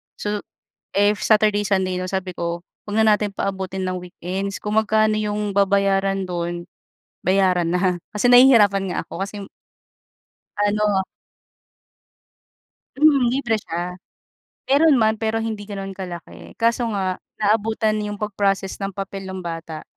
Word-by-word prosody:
So, 210 Hz, 0 st, -3 dB, 0.5 s
if 205 Hz, +1 st, +2 dB
Saturday, 210 Hz, -1 st, +3 dB
Sunday 190 Hz, -2 st, 0 dB
non 185 Hz, 0 st, -3 dB
sabi 190 Hz, -2 st, -3 dB
ko, 170 Hz, 0 st, -3 dB, 0.2 s
"'Huwag 210 Hz, +1 st, -2 dB
na 220 Hz, -1 st, +5 dB
natin 210 Hz, -1 st, -3 dB
paabutin 190 Hz, -1 st, -3 dB
ng 185 Hz, -, -2 dB
weekends. 190 Hz, +2 st, -5 dB
Kung 210 Hz, 0 st, -3 dB
magkano 215 Hz, 0 st, +3 dB
yung 210 Hz, -1 st, -2 dB
babayaran 195 Hz, -1 st, +2 dB
do'n, 175 Hz, -1 st, -4 dB, 0.6 s
bayaran 185 Hz, -2 st, +2 dB
na." 180 Hz, 0 st, +1 dB, 0.2 s
Kasi 210 Hz, +3 st, +1 dB
nahihirapan 215 Hz, -7 st, +6 dB
nga -, -, -3 dB
ako 190 Hz, -, -3 dB
kasi 200 Hz, -, -10 dB
m 195 Hz, -, -9 dB, 1.2 s
Ano 205 Hz, -2 st, +1 dB, 1.9 s
hmm, 280 Hz, -4 st, +5 dB
libre 245 Hz, -4 st, +1 dB
siya. 175 Hz, -1 st, -5 dB, 0.7 s
Meron 295 Hz, +2 st, +5 dB
man 220 Hz, -2 st, +2 dB
pero 225 Hz, 0 st, -1 dB
hindi 215 Hz, -2 st, -4 dB
gano'n 195 Hz, -1 st, -5 dB
kalaki, 180 Hz, -3 st, -9 dB
kaso 235 Hz, +1 st, +1 dB
nga 190 Hz, -2 st, -1 dB, 0.2 s
naabutan 215 Hz, +1 st, +1 dB
yung 205 Hz, -, -4 dB
pag-process 195 Hz, -2 st, -1 dB
nang 195 Hz, -1 st, -4 dB
papel 195 Hz, 0 st, -6 dB
ng 190 Hz, 0 st, -6 dB
bata 165 Hz, -2 st, -6 dB
200 Hz, 135 wpm, -22 LUFS, 185-215 Hz, 1.9 s, nahihirapan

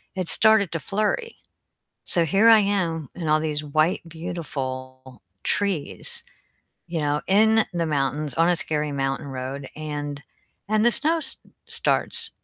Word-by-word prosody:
it 185 Hz, -2 st, -3 dB
started 220 Hz, -4 st, +6 dB
to 165 Hz, -, -2 dB
flurry, 215 Hz, -, -2 dB, 0.7 s
so 170 Hz, -, +3 dB
here 200 Hz, +7 st, +4 dB
I 225 Hz, -1 st, +8 dB
am 175 Hz, -8 st, -1 dB
in 165 Hz, -3 st, -4 dB
all 155 Hz, 0 st, +3 dB
these 150 Hz, -1 st, -2 dB
white, 155 Hz, +4 st, +1 dB
beautiful 130 Hz, -6 st, -6 dB, 0.2 s
trees, 195 Hz, -7 st, -1 dB, 0.7 s
you 170 Hz, -1 st, -3 dB
know, 150 Hz, 0 st, 0 dB
in 220 Hz, +3 st, +4 dB
the 170 Hz, -1 st, -1 dB
mountains 145 Hz, 0 st, -1 dB
on 165 Hz, +1 st, +3 dB
a 175 Hz, -, +3 dB
scary 150 Hz, -2 st, -2 dB
mountain 135 Hz, +1 st, -2 dB
road, 135 Hz, +1 st, -6 dB
and 145 Hz, -2 st, -5 dB, 0.5 s
and 215 Hz, +1 st, +2 dB
the 240 Hz, -, +5 dB
snow 320 Hz, +7 st, +3 dB
s 320 Hz, -, -1 dB, 0.3 s
starts, -, -, 0 dB
160 Hz, 145 wpm, -23 LUFS, 145-200 Hz, 0.7 s, I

